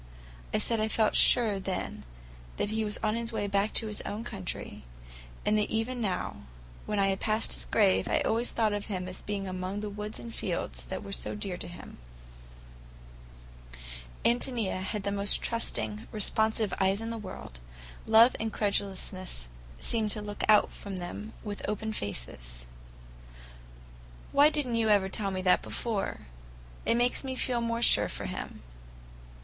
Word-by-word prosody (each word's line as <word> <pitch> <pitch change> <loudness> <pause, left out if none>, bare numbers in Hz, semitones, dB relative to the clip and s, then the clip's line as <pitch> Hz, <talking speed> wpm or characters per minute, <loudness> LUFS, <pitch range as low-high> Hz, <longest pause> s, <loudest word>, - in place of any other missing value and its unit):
I - - +2
said 230 -1 +1
I 215 - +1
felt 220 0 +2
sure 220 -5 +5
then 190 -1 -4 0.5
that - - 0
he 220 0 0
was 210 0 0
on 215 -1 +2
his 230 0 -2
way 220 - -1
back 200 +1 +1
to 225 - +5
his 210 -1 -4
own 210 +2 -4
country, 195 -7 -6 0.6
and 215 +1 +3
that 210 - 0
even 240 +3 -1
now, 190 -5 -2 0.5
when 210 - -1
I 195 -1 +3
passed 215 +2 +1
his - - -4
grave, 200 -4 +3
I - - +2
always 230 +2 +1
thought 220 -2 +1
of 205 0 -3
him 185 -4 -3
as 185 0 -7
being 200 -2 -3
among 185 +2 -3
the 210 -1 -4
woods 210 +1 -5
and 115 -1 -8
fields - - -3
that - - -5
were 200 - -8
so - - 0
dear 200 -3 -3
to - - -6
him. 175 - -11 2.3
Ántonia 235 -5 +1
had 195 +2 -3
the 200 - -1
most 200 0 +3
trusting, 230 -2 0
responsive 220 0 +2
eyes 195 +1 +3
in 225 +1 -4
the 230 - -3
world; 185 - -8 0.5
love 225 +3 +7
and 220 0 -1
credulousness 190 - -1 0.3
seemed 220 - +1
to 210 +1 -1
look 205 0 -5
out 210 -1 +8 0.2
of 200 -2 -4
them 195 +5 -6
with 205 -2 -5
open 220 +1 -2
faces. - - -3 1.7
"Why 290 +2 +7
did 295 -2 +1
n't 235 -2 -1
you 225 -1 +2
ever 200 -2 +4
tell 200 +1 0
me 185 -1 -3
that 180 -1 +4
before? 220 -5 -3 0.7
It 230 - +4
makes 245 +3 +2
me 260 -1 -3
feel 245 -2 +1
more 230 0 -1
sure - - +5
for - - -5
him." - - -6
210 Hz, 170 wpm, -30 LUFS, 190-225 Hz, 2.3 s, out